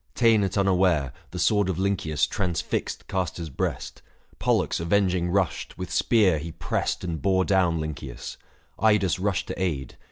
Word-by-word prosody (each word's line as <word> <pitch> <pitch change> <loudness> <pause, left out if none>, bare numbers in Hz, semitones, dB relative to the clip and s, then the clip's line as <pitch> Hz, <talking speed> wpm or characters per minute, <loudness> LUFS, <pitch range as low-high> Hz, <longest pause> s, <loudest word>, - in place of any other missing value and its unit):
Ta'en 115 -3 +4
at 95 +1 -2
unaware, 90 -8 +2 0.2
The 90 - -7
sword 100 +3 +2
of 90 - -1
Lynceus 95 -6 +1
transfixed 90 -4 -2
Castor's 85 -3 -3
breast; - - -3 0.4
Pollux - - +1
avenging 90 0 +1
rushed, 95 -4 -1
with 90 0 -6
spear 100 -9 +3
he 80 +2 -7
pressed 80 - -2
And 85 -4 -3
bore 95 -1 +2
down 90 -4 +2
Lynceus; 80 -2 -6 0.4
Idas 105 -4 +3
rushed 100 0 0
to - - -4
aid. 75 -9 -2
90 Hz, 150 wpm, -25 LUFS, 85-100 Hz, 0.4 s, Ta'en